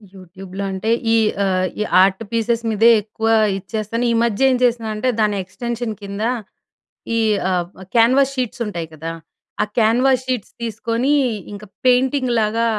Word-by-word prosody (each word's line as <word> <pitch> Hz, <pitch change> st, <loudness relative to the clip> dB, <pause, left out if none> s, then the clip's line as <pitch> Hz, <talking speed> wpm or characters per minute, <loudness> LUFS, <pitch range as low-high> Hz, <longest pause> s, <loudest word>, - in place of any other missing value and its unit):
యూట్యూబ్‍లో 190 Hz, +1 st, -9 dB
అంటే 190 Hz, +3 st, -3 dB, 0.2 s
ఈ -, -, +5 dB, 0.3 s
ఆ! -, -, +1 dB, 0.3 s
ఈ -, -, +1 dB, 0.2 s
ఆర్ట్ 190 Hz, +2 st, +1 dB
పీసెస్ 230 Hz, 0 st, 0 dB
మీదే 225 Hz, +2 st, +4 dB
ఎక్కువ 220 Hz, +1 st, -4 dB, 0.3 s
ఇచ్చేస్తాను. 220 Hz, +4 st, -3 dB
ఈ -, -, +2 dB
మధ్య 235 Hz, +3 st, +2 dB
ఏం 255 Hz, -, +2 dB
చేస్తున్నానంటే 230 Hz, -1 st, 0 dB
దాని 210 Hz, -1 st, +1 dB
ఎక్స్‌టెన్షన్ 235 Hz, +4 st, -4 dB
కింద 200 Hz, +1 st, -5 dB, 0.9 s
ఈ -, -, +2 dB, 0.3 s
ఆ! -, -, +1 dB, 0.4 s
కేన్వాస్ 260 Hz, +4 st, +4 dB
షీట్స్ 250 Hz, -1 st, -2 dB
ఉంటాయి 170 Hz, -5 st, -5 dB
కదా! 160 Hz, +2 st, -5 dB, 0.5 s
ఆ -, -, +3 dB
క్యాన్వాస్ 245 Hz, +3 st, +3 dB
షీట్స్ 250 Hz, -6 st, -3 dB
తీసుకొని 230 Hz, +4 st, -1 dB, 0.4 s
ఇంక 205 Hz, +1 st, -8 dB, 0.2 s
పెయింటింగ్ 255 Hz, +1 st, +3 dB
లాగా 220 Hz, +1 st, +1 dB
225 Hz, 140 wpm, -19 LUFS, 205-245 Hz, 0.9 s, ఈ